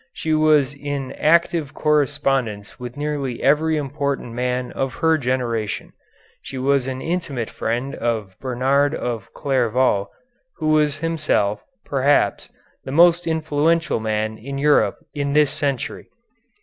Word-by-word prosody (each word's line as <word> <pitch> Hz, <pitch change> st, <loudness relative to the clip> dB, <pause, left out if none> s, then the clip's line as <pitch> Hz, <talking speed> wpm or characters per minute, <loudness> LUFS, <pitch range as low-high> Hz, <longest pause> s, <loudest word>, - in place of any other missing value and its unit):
She 160 Hz, -, -2 dB
was 155 Hz, -3 st, +4 dB
in 145 Hz, -2 st, -4 dB
active 165 Hz, -2 st, +2 dB
correspondence 135 Hz, -8 st, 0 dB
with 125 Hz, +2 st, -7 dB
nearly 145 Hz, -4 st, -3 dB
every 155 Hz, +3 st, +3 dB
important 140 Hz, -4 st, -3 dB
man 125 Hz, +1 st, -2 dB
of 135 Hz, -2 st, -3 dB
her 160 Hz, 0 st, +3 dB
generation. 120 Hz, -6 st, -2 dB, 0.5 s
She 135 Hz, -, -8 dB
was 135 Hz, 0 st, +1 dB
an 130 Hz, 0 st, -4 dB
intimate 155 Hz, -9 st, -3 dB
friend 125 Hz, +4 st, -2 dB
of 110 Hz, -5 st, -2 dB
Bernard 135 Hz, +3 st, +1 dB
of 115 Hz, -4 st, -4 dB
Clairvaux, 125 Hz, -6 st, +1 dB, 0.5 s
who 155 Hz, -2 st, -1 dB
was 150 Hz, -1 st, +3 dB
himself, 155 Hz, -10 st, 0 dB, 0.2 s
perhaps, 140 Hz, +1 st, +1 dB, 0.3 s
the 130 Hz, -, -6 dB
most 170 Hz, +3 st, +5 dB
influential 160 Hz, 0 st, +1 dB
man 110 Hz, 0 st, -2 dB
in 140 Hz, +4 st, -6 dB
Europe 145 Hz, +1 st, +3 dB, 0.2 s
in 140 Hz, -1 st, -2 dB
this 150 Hz, -2 st, +4 dB
century. 140 Hz, -4 st, -3 dB
140 Hz, 125 wpm, -21 LUFS, 125-150 Hz, 0.5 s, most